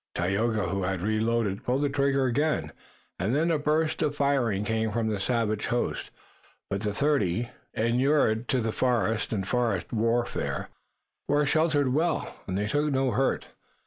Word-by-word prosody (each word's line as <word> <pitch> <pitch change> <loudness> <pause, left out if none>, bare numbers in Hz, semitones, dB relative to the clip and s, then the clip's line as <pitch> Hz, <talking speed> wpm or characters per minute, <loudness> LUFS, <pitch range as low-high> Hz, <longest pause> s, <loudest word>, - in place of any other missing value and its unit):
Tayoga, 100 +2 0
who 100 +2 -1
had 90 -1 -2
reloaded, 110 -1 0
pulled 140 +3 0
trigger 140 -1 +2
again 145 +5 0 0.5
and 105 +8 0
then 165 +3 +2
a 155 - +1
burst 155 +2 +1
of 145 -1 0
firing 130 -9 +1
came 110 0 0
from 110 +1 -1
the 105 -2 -1
savage 110 -1 0
host. 120 - -1 0.6
But 100 0 -1
the 105 -1 -1
thirty, 120 - 0 0.2
inured 120 0 +2
to 130 - +1
the 110 0 -1
forest 115 -2 0
and 95 -4 -2
forest 115 -6 0
warfare, 115 +2 -1 0.6
were 145 +1 +3
sheltered 150 -3 +2
well, 165 +3 0
and 95 -1 -2
they 105 - 0
took 145 +7 0
no 135 -1 +1
hurt. 135 +2 0
120 Hz, 155 wpm, -27 LUFS, 105-140 Hz, 0.6 s, were